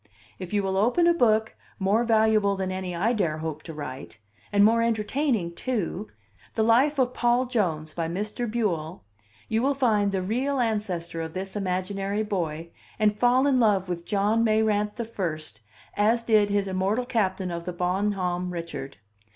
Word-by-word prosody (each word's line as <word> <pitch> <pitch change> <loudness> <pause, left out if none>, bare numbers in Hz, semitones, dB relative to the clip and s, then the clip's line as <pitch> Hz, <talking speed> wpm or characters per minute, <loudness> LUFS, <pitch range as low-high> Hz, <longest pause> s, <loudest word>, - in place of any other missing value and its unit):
If 185 -2 -7
you 205 -1 +1
will 190 0 -1
open 245 - +3
a 345 - +5
book 220 -7 +2 0.2
more 205 +4 +2
valuable 220 -3 +3
than 190 -1 -2
any 185 -1 -4
I 215 +8 +1
dare 170 -9 0
hope 155 -1 -5
to 165 - -9
write, 140 -5 -7 0.3
and 205 0 +5
more 230 +2 +4
entertaining 230 - 0
too, 210 -2 -3 0.5
The 220 - +2
Life 255 +7 +4
of 255 -2 +1
Paul 240 +1 +2
Jones, 170 - -1
by 165 -1 -2
Mr. 210 +7 -3
Buell, 180 - -2 0.4
you 220 +1 0
will 275 +2 +1
find 215 -7 +2
the 190 -1 -1
real 260 +8 -1
ancestor 195 -8 -2
of 160 0 -6
this 190 +2 -5
imaginary 195 +2 -2
boy, 170 -5 -3 0.3
and 210 -1 +2
fall 245 +4 +3
in 270 -3 +3
love 205 -5 +3
with 175 -1 -4
John 210 +2 +2
Mayrant 215 -1 +1
the 235 - -3
First, 155 - -4 0.3
as 225 +3 +2
did 215 -3 +3
his 200 -1 0
immortal 195 +6 0
captain 190 -6 -1
of 170 0 -5
the 180 - -4
Bon 185 +4 0
Homme 180 -1 -2
Richard. 160 -8 -6
205 Hz, 175 wpm, -26 LUFS, 180-225 Hz, 0.5 s, a